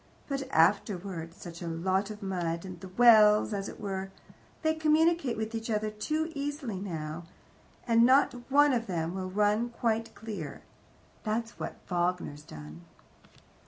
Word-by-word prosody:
But 275 Hz, -1 st, -3 dB
afterwards 180 Hz, -2 st, +1 dB
such 170 Hz, -1 st, -9 dB
a 170 Hz, -, -4 dB
lot 185 Hz, +5 st, 0 dB
of 210 Hz, -1 st, -8 dB
mud; 175 Hz, -3 st, -2 dB
and 180 Hz, -2 st, -8 dB
the 190 Hz, -, -9 dB
wells 215 Hz, 0 st, +6 dB
as 195 Hz, -1 st, -3 dB
it -, -, -10 dB
were, 195 Hz, -2 st, -4 dB, 0.5 s
they 315 Hz, 0 st, +3 dB
communicate 315 Hz, -4 st, +2 dB
with 220 Hz, +1 st, -3 dB
each 225 Hz, 0 st, -4 dB
other 215 Hz, -1 st, 0 dB
too 310 Hz, +10 st, -2 dB
easily 280 Hz, -8 st, -3 dB
now, 165 Hz, -3 st, -5 dB, 0.6 s
and 230 Hz, -1 st, +5 dB
not 260 Hz, +4 st, +5 dB, 0.2 s
one 290 Hz, +1 st, +5 dB
of 235 Hz, -2 st, -1 dB
them 170 Hz, -2 st, -2 dB
will 185 Hz, -1 st, -4 dB
run 210 Hz, +4 st, +2 dB
quite 230 Hz, -1 st, -1 dB
clear. 195 Hz, -11 st, -7 dB, 0.6 s
That's 225 Hz, +1 st, -3 dB
what -, -, -4 dB
Wagner's 175 Hz, -4 st, -1 dB
done." 75 Hz, -, -11 dB
210 Hz, 150 wpm, -30 LUFS, 180-235 Hz, 0.6 s, wells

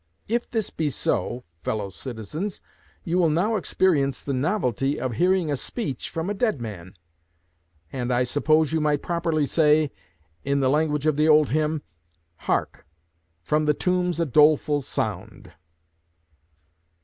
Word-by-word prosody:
If 235 Hz, +2 st, -1 dB
this 225 Hz, -4 st, -2 dB
be 155 Hz, -2 st, -1 dB
so, 120 Hz, -1 st, -1 dB, 0.2 s
fellow 100 Hz, +2 st, -3 dB
citizens, 130 Hz, -, -6 dB, 0.4 s
you 175 Hz, +2 st, 0 dB
will 170 Hz, -3 st, +4 dB
now 185 Hz, +9 st, +1 dB
experience 155 Hz, -9 st, +1 dB
the 140 Hz, -, -2 dB
novelty 135 Hz, -, 0 dB
of 130 Hz, -2 st, -2 dB
hearing 180 Hz, -, +2 dB
a -, -, +1 dB
speech 140 Hz, -, -5 dB
from 165 Hz, +1 st, -3 dB
a 205 Hz, -, -1 dB
dead 210 Hz, -, 0 dB
man; 100 Hz, -5 st, -8 dB, 1.0 s
and 125 Hz, -2 st, -2 dB
I 125 Hz, 0 st, +2 dB
suppose 155 Hz, +4 st, +2 dB
you 160 Hz, -, +1 dB
might 150 Hz, -1 st, +1 dB
properly 165 Hz, -3 st, 0 dB
say, 150 Hz, +1 st, +3 dB, 0.5 s
in 140 Hz, 0 st, +1 dB
the 130 Hz, -1 st, +2 dB
language 150 Hz, -1 st, +1 dB
of 155 Hz, -2 st, +2 dB
the 155 Hz, +1 st, +3 dB
old 150 Hz, -2 st, +5 dB
hymn: 155 Hz, +1 st, 0 dB, 0.6 s
"Hark! -, -, -1 dB, 0.6 s
from 150 Hz, -, +1 dB
the 150 Hz, -1 st, +2 dB
tombs 180 Hz, 0 st, 0 dB
a 170 Hz, -, +2 dB
doleful 150 Hz, +1 st, +4 dB
sound!"' -, -, -4 dB
150 Hz, 145 wpm, -24 LUFS, 135-170 Hz, 1.0 s, old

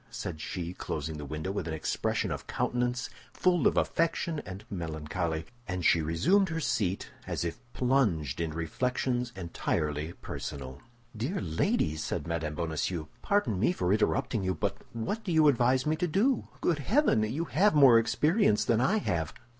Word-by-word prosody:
said 80 Hz, -3 st, -5 dB
she, 85 Hz, +2 st, -4 dB
closing 75 Hz, -3 st, -4 dB
the 75 Hz, -, -6 dB
window 80 Hz, +6 st, -4 dB
with 100 Hz, -4 st, -3 dB
an 80 Hz, -, -2 dB
expression 80 Hz, -, -1 dB
of -, -, -5 dB
countenance 125 Hz, +1 st, -1 dB, 0.3 s
full 180 Hz, -2 st, +3 dB
of -, -, +1 dB
affection 165 Hz, -1 st, 0 dB
and 95 Hz, +3 st, -7 dB
melancholy. 80 Hz, -2 st, -3 dB, 0.2 s
And 90 Hz, -3 st, -3 dB
she 85 Hz, -, +5 dB
resumed 165 Hz, -, +3 dB
her 165 Hz, 0 st, -2 dB
seat, 100 Hz, -, -1 dB, 0.2 s
as -, -, -2 dB
if 85 Hz, -, -4 dB
plunged 100 Hz, -, +1 dB
in 85 Hz, -, -1 dB
reflections 120 Hz, -, -1 dB
entirely 80 Hz, -3 st, -2 dB
personal. 65 Hz, -2 st, -7 dB, 0.3 s
"Dear 130 Hz, -, -2 dB
lady," 80 Hz, -2 st, 0 dB
said -, -, -3 dB
Mme. 80 Hz, -2 st, -2 dB
Bonacieux, 80 Hz, 0 st, -2 dB
"pardon 200 Hz, -, +1 dB
me 115 Hz, -, +3 dB
for 90 Hz, -, 0 dB
interrupting 110 Hz, 0 st, +1 dB
you; 95 Hz, -1 st, 0 dB
but 75 Hz, -, -1 dB, 0.2 s
what 120 Hz, -, -3 dB
do 190 Hz, -, -3 dB
you 160 Hz, -2 st, +5 dB
advise 130 Hz, -1 st, +3 dB
me 155 Hz, +1 st, +2 dB
to 180 Hz, -, 0 dB
do? 215 Hz, -, +1 dB
Good 165 Hz, -4 st, +1 dB
heaven! 220 Hz, -, +3 dB
You 130 Hz, +10 st, -1 dB
have 185 Hz, +5 st, +3 dB
more 135 Hz, -6 st, +8 dB
experience 150 Hz, -, +2 dB
than 115 Hz, -1 st, +2 dB
I 190 Hz, +11 st, +3 dB
have. 80 Hz, -, -1 dB
105 Hz, 165 wpm, -29 LUFS, -, 0.3 s, more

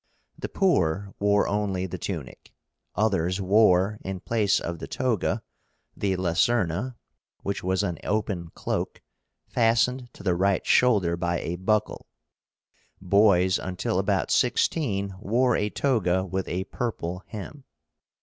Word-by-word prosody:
The -, -, -6 dB
poor 100 Hz, -, +1 dB
wore 100 Hz, 0 st, +3 dB
only 100 Hz, -3 st, -1 dB
the 95 Hz, -, -6 dB
tunic, 80 Hz, -10 st, -6 dB, 0.4 s
others 95 Hz, -3 st, +1 dB
wore, 100 Hz, 0 st, +3 dB
in 95 Hz, -1 st, -4 dB
place 105 Hz, 0 st, +1 dB
of 85 Hz, -1 st, -5 dB
the -, -, -6 dB
toga, 115 Hz, -3 st, -1 dB, 0.5 s
the 95 Hz, -2 st, 0 dB
LACERNA, 95 Hz, +5 st, +1 dB, 0.5 s
which 100 Hz, -, -3 dB
was 95 Hz, +2 st, +1 dB
an 90 Hz, -5 st, -2 dB
open 100 Hz, -5 st, -2 dB
cloak, -, -, -3 dB, 0.4 s
fastened 120 Hz, +2 st, +1 dB
to -, -, -12 dB
the 95 Hz, -2 st, +2 dB
right 95 Hz, +2 st, +1 dB
shoulder 100 Hz, -9 st, +3 dB
by 85 Hz, 0 st, -1 dB
a 85 Hz, -, -3 dB
buckle. 105 Hz, +4 st, -1 dB, 0.9 s
Boys, 95 Hz, -1 st, +4 dB
until 90 Hz, -1 st, -2 dB
about -, -, 0 dB
sixteen, 100 Hz, -11 st, +1 dB
wore 120 Hz, +5 st, +2 dB
a 105 Hz, -, 0 dB
toga 95 Hz, -9 st, +1 dB
with 95 Hz, 0 st, -3 dB
a 90 Hz, +2 st, -2 dB
purple 95 Hz, -6 st, -4 dB
hem. 125 Hz, +7 st, -8 dB
100 Hz, 130 wpm, -26 LUFS, 90-110 Hz, 0.9 s, Boys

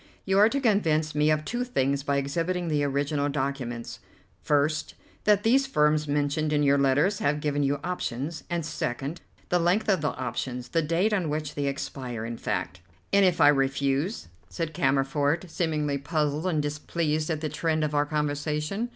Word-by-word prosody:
"You 195 Hz, 0 st, +3 dB
are 210 Hz, +2 st, +7 dB
to 275 Hz, -, -1 dB
convince 165 Hz, -, +2 dB
me 150 Hz, +1 st, +2 dB
of 155 Hz, 0 st, +1 dB
two 245 Hz, +1 st, -2 dB
things 140 Hz, -, 0 dB
by 140 Hz, 0 st, 0 dB
exhibiting 165 Hz, +5 st, -1 dB
the 150 Hz, -2 st, +1 dB
original 145 Hz, +1 st, 0 dB
documents: 130 Hz, -4 st, -3 dB, 0.4 s
first, 150 Hz, +2 st, 0 dB, 0.3 s
that 210 Hz, -1 st, +4 dB
these 265 Hz, +4 st, +3 dB
firms 150 Hz, -, +2 dB
mentioned 145 Hz, +1 st, 0 dB
in 150 Hz, -1 st, +2 dB
your 140 Hz, 0 st, +4 dB
letters 145 Hz, +9 st, +2 dB
have 150 Hz, +1 st, +1 dB
given 145 Hz, -1 st, -1 dB
you 140 Hz, 0 st, +1 dB
options; 150 Hz, -3 st, -3 dB
and 170 Hz, -2 st, -2 dB
second, 140 Hz, +1 st, -3 dB, 0.3 s
the 180 Hz, -, +3 dB
length 180 Hz, +6 st, +2 dB
of 190 Hz, -5 st, +3 dB
the 150 Hz, -, +1 dB
options, 125 Hz, 0 st, -4 dB
the 165 Hz, -, +1 dB
date 170 Hz, +7 st, +1 dB
on 180 Hz, -6 st, 0 dB
which 150 Hz, 0 st, -3 dB
they 145 Hz, -1 st, -2 dB
expire, 130 Hz, -4 st, -4 dB
in 115 Hz, 0 st, -5 dB
fact." 95 Hz, -4 st, -3 dB, 0.3 s
"And 200 Hz, 0 st, +6 dB
if 180 Hz, -3 st, +3 dB
I -, -, +7 dB
refuse?" 135 Hz, -, 0 dB, 0.2 s
said 165 Hz, -2 st, -4 dB
Cammerford, 140 Hz, +4 st, +1 dB
seemingly 150 Hz, -5 st, -1 dB
puzzled 150 Hz, +2 st, -1 dB
and 155 Hz, -5 st, +1 dB
displeased 155 Hz, +1 st, -1 dB
at 155 Hz, -2 st, -1 dB
the 155 Hz, -, -1 dB
trend 160 Hz, -1 st, 0 dB
of 150 Hz, -1 st, -1 dB
our 145 Hz, 0 st, +2 dB
conversation. 150 Hz, +8 st, -2 dB
150 Hz, 175 wpm, -27 LUFS, 140-170 Hz, 0.4 s, are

